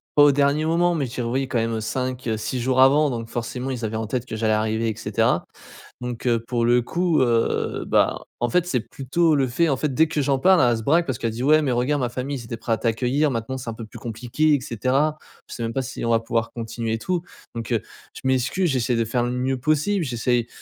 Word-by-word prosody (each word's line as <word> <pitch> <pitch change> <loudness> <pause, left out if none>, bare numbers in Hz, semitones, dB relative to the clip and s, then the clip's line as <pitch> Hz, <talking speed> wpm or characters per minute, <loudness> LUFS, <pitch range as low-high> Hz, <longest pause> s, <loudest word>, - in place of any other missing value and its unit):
pas 145 - +7
au 145 - +7
dernier 140 +2 +2
moment, 170 +2 +2
mais 145 -5 -1
je 120 - -11
dirais, 120 -2 -2
oui, 130 +3 -1
quand 125 - -1
même 115 -1 -1
5-6 125 0 -2
jours 130 +1 +2
avant 145 +3 +5
donc 115 -2 -4
forcément 120 +2 -4
ils 120 -3 -5
avaient 110 0 -3
en 110 0 -2
tête 125 +2 -3
que - - -5
j'allais 110 0 +1
arriver 110 +1 0
et 110 - -3
cetera. - - 0 0.6
Donc, 125 0 -5
heu, 115 -2 +2
pour 120 -2 0
le 120 +1 +4
coup, 170 +3 +1
heu, 115 -2 +1
bah, - - +2 0.2
en 120 - +1
fait 180 +4 +2
c'est 130 -9 0
plutôt 150 +7 0
le 135 -2 +2
fait, 160 +7 +1
en 135 - +2
fait, 140 0 -2
dès 160 +4 +4
que 150 - -1
j'en 135 -1 +1
parle 185 +2 +5
elle 120 - +2
se 110 - -5
braque 165 +8 +3
parce 130 -2 -2
qu'elle 115 -2 -1
dit: 115 +3 -5
«Ouais 155 +2 +5
mais 135 - 0
regarde 125 +4 +1
ma 125 - 0
famille 130 +3 -4
ils - - -9
étaient 115 0 -5
prêts 115 0 -3
à - - +3
t'accueillir 125 +6 +1
maintenant 115 +2 -3
c'est 120 -3 -5
un - - -6
peu 115 - -8
plus - - -12
compliqué 125 +7 0
et 145 - +1
cetera. 130 +6 0 0.3
Je - - -8
sais 120 - -5
même 115 - -2
pas 135 - 0
si 130 +1 -6
on 115 - 0
va 115 - +4
pouvoir 115 0 -1
continuer 115 -1 -3
et 115 - -2
tout», 180 +7 -2 0.3
donc, 115 -2 -5
heu, - - +2 0.3
je - - -10
m'excuse 130 +8 +1
j'essaie 125 -2 0
de 115 - +1
faire 120 +2 -1
le 120 - -1
mieux 130 +1 -1
possible, 155 +7 +1
j'essaye 120 -2 0
125 Hz, 260 wpm, -23 LUFS, 115-140 Hz, 0.6 s, pas